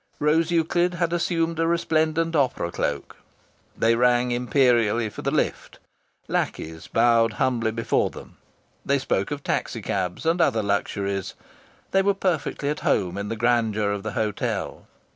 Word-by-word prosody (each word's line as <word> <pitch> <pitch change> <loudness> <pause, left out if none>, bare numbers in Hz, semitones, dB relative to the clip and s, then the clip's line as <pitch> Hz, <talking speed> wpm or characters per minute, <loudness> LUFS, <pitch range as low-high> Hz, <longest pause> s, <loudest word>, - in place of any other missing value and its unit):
Rose 160 +3 +2
Euclid 175 +1 +1
had 170 0 0
assumed 165 -1 0
a 165 - +2
resplendent 165 0 +1
opera 130 - +1
cloak. - - -3 0.6
They 115 +1 +3
rang 125 +1 +3
imperially 120 -3 +2
for - - -8
the - - -1
lift. - - -2 0.5
Lackeys 80 0 -3
bowed 115 -1 +3
humbly 120 -1 0
before 115 +1 0
them. - - -12 0.5
They 140 - +2
spoke 100 -7 -1
of 145 -1 -5
taxi - - -2
cabs 90 - -3
and 165 +2 +2
other 110 -9 +2
luxuries. 100 -1 -2 0.6
They 195 - +4
were 200 0 +2
perfectly 170 -6 -1
at 150 - -2
home 90 -2 0
in 100 +1 -4
the 115 - -2
grandeur 110 -3 +1
of 100 -1 -3
the 110 +1 -5
hotel. 105 -2 -3
125 Hz, 150 wpm, -24 LUFS, 110-165 Hz, 0.6 s, They